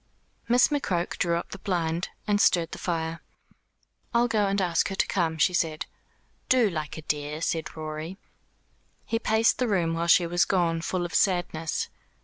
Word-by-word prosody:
Miss 245 +1 +5
McCroke 185 - -1
drew 170 -1 +2
up 170 - -6
the 195 - -7
blind, 170 -3 -1 0.2
and 205 -1 +2
stirred 170 -4 +3
the - - -7
fire. 165 -1 -2 0.9
"I'll 240 +1 +4
go 215 -3 +1
and 200 +1 0
ask 175 -3 +1
her 195 - -4
to - - +2
come," 165 -4 0
she 180 +3 +3
said. 160 -3 0 0.6
"Do, 245 -6 +4
like 155 -2 -4
a 160 - -8
dear," 150 0 -2
said 165 -1 -2
Rorie. 155 +3 -5 0.9
He 225 - -1
paced 220 0 +2
the 250 - +1
room 175 -6 +1
while 165 +1 -1
she 175 0 +6
was 175 +1 +2
gone, 170 -3 +1
full 175 +1 -2
of 175 - -7
sadness. 175 -4 0
175 Hz, 175 wpm, -27 LUFS, 165-195 Hz, 0.9 s, she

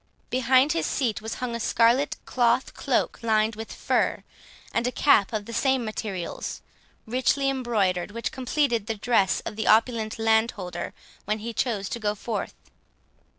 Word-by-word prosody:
Behind 260 +3 +4
his 335 - -1
seat 235 -7 -1
was 220 +1 -5
hung 250 -2 -4
a 235 - -3
scarlet 235 +5 +2
cloth 245 +1 +1
cloak - - 0
lined 220 -1 +2
with 220 +1 -7
fur, - - 0 0.5
and 235 - +1
a - - 0
cap 215 -8 +4
of 215 -2 -3
the 230 - -8
same 265 -1 +1
materials 205 -5 -5 0.4
richly 260 +4 +1
embroidered, 210 -9 0
which 230 +2 -4
completed 255 -4 0
the 225 - -1
dress 205 -3 +2
of 210 - -7
the 220 - -2
opulent 225 0 +3
landholder 220 -4 0 0.3
when 215 +1 0
he 230 +2 -6
chose 215 -5 -1
to 235 - -4
go 210 -1 -1
forth. 215 0 -4
230 Hz, 155 wpm, -26 LUFS, 215-250 Hz, 0.5 s, Behind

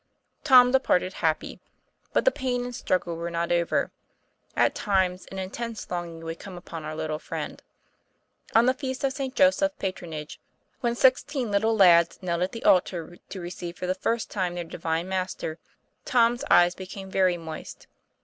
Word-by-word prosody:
Tom 250 -3 +7
departed 190 -8 +2
happy. 160 -2 -1 0.5
But - - +1
the - - +6
pain 255 - -2
and 245 - -6
struggle 180 -7 -1
were 170 +1 -3
not 170 0 -2
over. 170 -1 +1 0.6
At - - +3
times 190 -3 0
an 195 - -9
intense 220 +4 -5
longing 170 -2 -4
would 165 0 -5
come 190 -3 -9
upon 165 -2 -8
our 155 0 -5
little 155 -1 -3
friend. - - -6 0.9
On 225 +1 +6
the 255 - +4
feast 260 -1 -5
of 270 -1 +1
St. 270 -1 -4
Joseph's 290 +1 +3
Patronage, 170 -5 -5 0.4
when 240 -2 0
six 260 +1 +5
teen 260 -7 -3
little 220 +3 +2
lads 170 -4 +6
knelt 170 -1 -1
at 180 - 0
the 230 - -7
altar 175 -2 +2
to 195 - -6
receive 175 0 -6
for - - -4
the 185 - +1
first 230 +4 -2
time 180 -3 -1
their 175 - -3
divine 165 +1 -3
Master, 185 -4 -3 0.4
Tom's 240 -2 +3
eyes 175 0 +6
became 190 +1 -8
very 185 -2 +3
moist. 160 -2 -8
185 Hz, 170 wpm, -26 LUFS, 170-235 Hz, 0.9 s, Tom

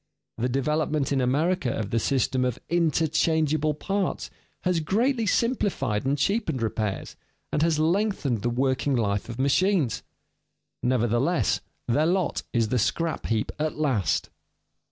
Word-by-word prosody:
The 125 +2 0
development 150 +2 0
in 135 -2 +2
America 145 +3 +1
of 105 -3 -3
the 115 - +2
system 130 +1 +1
of 125 -2 0
"interchangable 155 -2 +2
parts" 195 +4 -2 0.3
has 180 -2 +1
greatly 225 - +1
simplified 195 - 0
and 140 +2 +1
cheapened 160 - 0
repairs, 110 -3 -2 0.4
and 150 - 0
has 165 -1 +2
lengthened 160 - +1
the 120 - 0
working 130 +2 +1
life 105 -2 0
of 115 - -6
machines; 140 - +2 0.8
nevertheless 125 +6 +1 0.3
their 145 +6 +2
lot 185 0 0
is 115 -2 +1
the 125 - +1
scrap 160 +8 -1
heap 110 -1 0
at 155 0 -1
last. 125 - 0
145 Hz, 135 wpm, -26 LUFS, 120-170 Hz, 0.8 s, in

